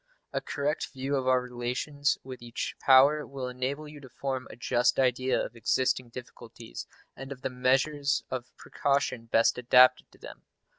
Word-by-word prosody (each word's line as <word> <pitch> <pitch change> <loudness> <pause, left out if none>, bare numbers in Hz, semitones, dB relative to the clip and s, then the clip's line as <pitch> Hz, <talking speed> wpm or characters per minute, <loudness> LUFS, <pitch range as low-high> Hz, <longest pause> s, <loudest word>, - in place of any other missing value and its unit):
A - - -1
correct 145 +1 -2
view 135 +1 -2
of 130 -1 -1
our 130 0 +4
relations 125 +4 -2
with 130 -2 -9
each 120 0 -5
power 140 +3 +5
will 135 -3 -6
enable 130 +4 -4
you 150 0 -11
to 135 -2 -13
form 130 +1 -4
a - - -10
just 120 0 +1
idea 130 0 +2
of - - -4
existing 125 +2 0
difficulties, 120 - -10 0.3
and 135 0 -9
of 135 -1 -9
the - - -2
measures 135 +3 +1
of 125 -1 -5
precaution 140 -4 -1
best 115 +1 +2
adapted 125 +1 +5
to - - -20
them. - - -11
130 Hz, 165 wpm, -28 LUFS, 125-140 Hz, 0.3 s, power